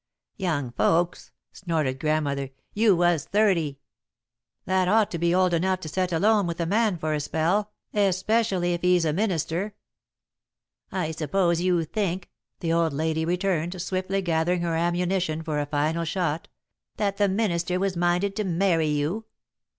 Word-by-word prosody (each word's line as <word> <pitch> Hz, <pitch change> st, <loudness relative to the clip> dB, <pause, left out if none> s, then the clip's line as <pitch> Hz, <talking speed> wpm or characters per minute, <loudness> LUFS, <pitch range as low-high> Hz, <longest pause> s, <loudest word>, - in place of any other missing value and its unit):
"Young 155 Hz, -, -1 dB
folks!" 170 Hz, +7 st, +1 dB, 0.2 s
snorted 155 Hz, -8 st, -2 dB
Grandmother. 145 Hz, -3 st, 0 dB, 0.2 s
"You 210 Hz, -2 st, +4 dB
was 175 Hz, -3 st, +2 dB
thirty!" 185 Hz, -9 st, +1 dB, 0.9 s
"That 185 Hz, 0 st, +1 dB
ought 215 Hz, +2 st, +3 dB
to 170 Hz, -, -3 dB
be 170 Hz, +1 st, +2 dB
old 185 Hz, -1 st, +3 dB
enough 185 Hz, +2 st, +1 dB
to 160 Hz, -, -6 dB
set 185 Hz, +2 st, -1 dB
alone 200 Hz, +3 st, +3 dB
with 170 Hz, 0 st, -4 dB
a 170 Hz, -, 0 dB
man 210 Hz, +1 st, +1 dB
for 155 Hz, -1 st, -2 dB
a 150 Hz, -, 0 dB
spell, 170 Hz, +8 st, 0 dB, 0.2 s
especially 195 Hz, -2 st, +1 dB
if 175 Hz, -, -3 dB
he's 180 Hz, -2 st, +3 dB
a 155 Hz, -, +1 dB
minister." 190 Hz, +1 st, -1 dB, 1.2 s
"I 180 Hz, -4 st, -2 dB
suppose 170 Hz, +2 st, 0 dB
you 180 Hz, -2 st, +2 dB
think," 185 Hz, 0 st, -3 dB, 0.3 s
the 165 Hz, -1 st, 0 dB
old 165 Hz, -2 st, +2 dB
lady 160 Hz, +2 st, 0 dB
returned, 175 Hz, 0 st, -1 dB
swiftly 190 Hz, +2 st, -2 dB
gathering 170 Hz, +1 st, +1 dB
her 170 Hz, -1 st, -1 dB
ammunition 175 Hz, -1 st, 0 dB
for 155 Hz, -2 st, -2 dB
a 145 Hz, -, -2 dB
final 155 Hz, +3 st, 0 dB
shot, 165 Hz, -2 st, -2 dB, 0.5 s
"that 200 Hz, -2 st, -1 dB
the 205 Hz, -1 st, +3 dB
minister 180 Hz, -3 st, 0 dB
was 195 Hz, -1 st, 0 dB
minded 175 Hz, +3 st, +1 dB
to 215 Hz, -, 0 dB
marry 175 Hz, -3 st, +1 dB
you. 150 Hz, +9 st, -1 dB
175 Hz, 155 wpm, -25 LUFS, 160-190 Hz, 1.2 s, You